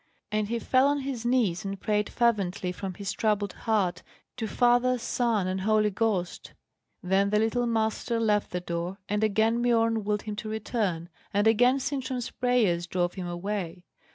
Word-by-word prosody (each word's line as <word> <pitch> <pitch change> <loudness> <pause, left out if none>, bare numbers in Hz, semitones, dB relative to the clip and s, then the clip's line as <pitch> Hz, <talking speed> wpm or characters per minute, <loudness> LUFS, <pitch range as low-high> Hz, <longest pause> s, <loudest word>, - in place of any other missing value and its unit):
And 210 0 0
he 235 +2 -1
fell 255 +3 +3
on 285 0 +1
his 260 -4 -3
knees, 230 -9 +1
and 195 -1 -5
prayed 210 +1 0
fervently 200 -6 0
from 185 0 -6
his 200 0 -4
troubled 210 -3 0
heart 190 -6 0 0.4
to 225 -2 -2
Father, 245 +4 +3
Son, 230 -3 0
and 185 +1 -2
Holy 215 +1 +2
Ghost. 195 -4 -2 0.5
Then 190 +2 +2
the 210 - +2
little 225 +3 +1
Master 225 +1 0
left 210 -2 +1
the 180 - -3
door, 175 +2 -4
and 210 +1 0
again 220 +2 +2
Biorn 230 -2 +2
willed 210 0 -1
him 215 -2 -5
to 215 0 -5
return, 210 -6 -2 0.2
and 205 +1 +1
again 245 +4 +4
Sintram's 260 -2 -3
prayers 220 -9 +1
drove 175 0 -1
him 185 -2 -5
away. 175 -1 -4
215 Hz, 170 wpm, -27 LUFS, 190-235 Hz, 0.5 s, again